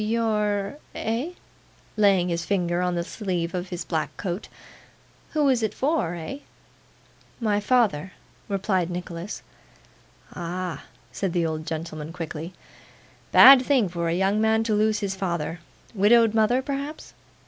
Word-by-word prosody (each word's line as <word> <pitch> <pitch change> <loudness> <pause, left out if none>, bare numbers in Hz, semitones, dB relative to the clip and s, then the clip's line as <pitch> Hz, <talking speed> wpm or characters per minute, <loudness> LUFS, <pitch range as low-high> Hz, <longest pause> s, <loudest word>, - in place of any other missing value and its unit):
'You're 210 0 0 0.2
Eh?' 240 +10 -2 0.6
laying 195 -4 +3
his 170 -1 -1
finger 175 -2 0
on 180 -1 0
the 170 - -1
sleeve 175 -3 -3
of 180 0 -4
his 175 -2 -5
black 160 -3 -3
coat. 185 +1 -4 0.9
'Who's 275 -6 +3
it 215 -1 -1
for, 270 - 0
eh?' 175 - -6 1.0
'My 210 -3 +1
father,' 205 -7 +1 0.4
replied 190 -3 0
Nicholas. 175 +1 -6 0.9
'Ah!' 175 -3 -5 0.3
said 190 -4 -2
the 175 -2 +1
old 155 -1 -3
gentleman 160 -1 -5
quickly. 165 0 -6 0.8
'Bad 270 -1 +10
thing 260 -6 +3
for 170 -1 -2
a 165 - 0
young 195 +3 +1
man 220 0 +3
to 225 -1 0
lose 215 +1 +2
his 195 -1 -2
father. 170 -3 -3 0.3
Widowed 225 +2 +5
mother, 225 +4 +2
perhaps? 280 +3 -5
195 Hz, 135 wpm, -25 LUFS, 170-220 Hz, 1.0 s, Bad